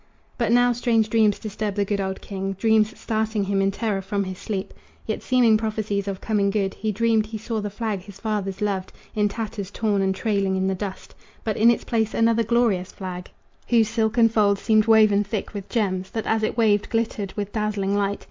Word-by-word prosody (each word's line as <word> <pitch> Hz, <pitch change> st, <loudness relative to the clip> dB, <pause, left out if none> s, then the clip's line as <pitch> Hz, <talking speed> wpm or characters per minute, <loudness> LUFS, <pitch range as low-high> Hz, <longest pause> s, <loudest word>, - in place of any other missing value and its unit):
But 235 Hz, -3 st, 0 dB
now 245 Hz, +1 st, +5 dB
strange 225 Hz, -3 st, +1 dB
dreams 215 Hz, -3 st, +3 dB
disturb 210 Hz, -1 st, -4 dB
the 205 Hz, -1 st, +1 dB
good 200 Hz, 0 st, -1 dB
old 190 Hz, 0 st, -3 dB
king 195 Hz, -1 st, -4 dB
Dreams 220 Hz, +2 st, +2 dB
starting 220 Hz, -1 st, -1 dB
him 195 Hz, 0 st, 0 dB
in 195 Hz, -, +2 dB
terror 200 Hz, -1 st, -2 dB
from 200 Hz, +1 st, -2 dB
his 185 Hz, -1 st, -6 dB
sleep, 195 Hz, -4 st, -4 dB, 0.3 s
Yet -, -, -3 dB
seeming 240 Hz, -4 st, +4 dB
prophecies 215 Hz, -2 st, -2 dB
of 195 Hz, -1 st, -3 dB
coming 205 Hz, -3 st, +1 dB
good. 195 Hz, -2 st, 0 dB
He 215 Hz, 0 st, -2 dB
dreamed 220 Hz, 0 st, +1 dB
he 220 Hz, 0 st, -5 dB
saw 220 Hz, 0 st, -3 dB
the 205 Hz, -, -3 dB
flag 210 Hz, -1 st, -3 dB
his 200 Hz, +1 st, -13 dB
fathers 210 Hz, -4 st, -3 dB
loved 195 Hz, -3 st, -2 dB, 0.2 s
In 210 Hz, -1 st, +1 dB
tatters 210 Hz, -2 st, -5 dB
torn 205 Hz, -1 st, 0 dB
and 190 Hz, 0 st, +1 dB
trailing 200 Hz, -2 st, 0 dB
in 190 Hz, 0 st, 0 dB
the 190 Hz, -, +1 dB
dust, 190 Hz, 0 st, -6 dB, 0.3 s
But 215 Hz, -2 st, -1 dB
in 225 Hz, +2 st, +5 dB
its 235 Hz, -, +2 dB
place 220 Hz, -2 st, -1 dB
another 230 Hz, 0 st, +3 dB
glorious 225 Hz, -5 st, +1 dB
flag, 180 Hz, -2 st, -7 dB, 0.4 s
Whose 230 Hz, -2 st, +3 dB
silken 225 Hz, +1 st, +3 dB
folds 205 Hz, -3 st, +2 dB
seemed 215 Hz, -1 st, +3 dB
woven 215 Hz, -2 st, +5 dB
thick 205 Hz, +1 st, -4 dB
with 200 Hz, -2 st, -7 dB
gems 190 Hz, -5 st, -1 dB
That 225 Hz, -, -4 dB
as 220 Hz, 0 st, +1 dB
it 215 Hz, +1 st, -1 dB
waved 210 Hz, -3 st, +2 dB
glittered 225 Hz, -4 st, -2 dB
with 205 Hz, -1 st, -4 dB
dazzling 205 Hz, -2 st, -1 dB
light. 200 Hz, 0 st, 0 dB
210 Hz, 205 wpm, -23 LUFS, 195-225 Hz, 0.4 s, now